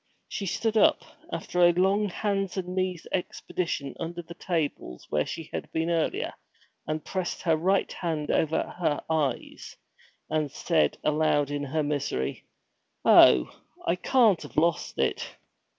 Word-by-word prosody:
She 200 - -4
stood 225 +4 0
up, - - +4 0.3
after 180 - -2
a 175 0 +7
long 195 +4 +2
hands 195 0 -2
and 180 -1 -3
knees 185 -2 -2
expedition 170 -5 -3
under 170 +1 -5
the 170 - -10
tables 155 - -3
where 75 0 +1
she 165 -2 -6
had - - -5
been 165 +1 0
earlier, 165 -2 0 0.5
and 155 0 -3
pressed 185 -2 -3
her 165 -3 +3
right 190 +5 +1
hand 160 -4 -2
over 160 0 +1 0.2
her 155 -4 0
eyes, 145 -6 -2 0.5
and 155 -3 -1
said 165 +2 +1
aloud 150 -2 +2
in 145 0 -2
her 155 +3 -1
misery, 140 - -2 0.6
'Oh, 65 -1 +7 0.3
I 170 - +2
can't 220 -1 +3
have - - -11
lost 170 +1 +1
it! - - -1
165 Hz, 145 wpm, -27 LUFS, 150-185 Hz, 0.6 s, a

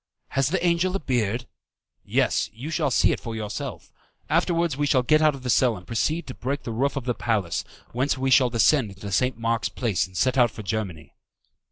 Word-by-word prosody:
"Has 135 -1 +1
the 180 +3 0
angel 175 +2 +2
a - - 0
beard?" 120 - -1 0.6
"Yes, - - +1
you 135 +8 -6
shall 155 -3 +1
see - - +3
it - - -1
for 115 -1 -6
yourself. 105 -1 -5 0.4
Afterwards 170 -4 +1
we 145 +1 0
will 130 -2 +3
get 155 +4 +4
out 155 -2 +4
of 135 - -11
the 125 - -3
cell 120 -4 +3
and 90 - -13
proceed 155 - -1
to 130 - -7
break 135 +3 -3
the 115 - -4
roof 135 +5 0
of 135 -3 -4
the 125 - 0
palace, 105 -8 -1 0.3
whence 130 +3 0
we 130 0 0
shall 130 -1 +5
descend 115 +2 +3
into 100 +1 -8
St. 125 +4 +1
Mark's 115 0 0
Place 110 -7 -1
and 95 -1 -10
set 130 0 +2
out 120 -1 +5
for 110 - -9
Germany." 95 -6 -4
125 Hz, 215 wpm, -25 LUFS, 110-145 Hz, 0.6 s, shall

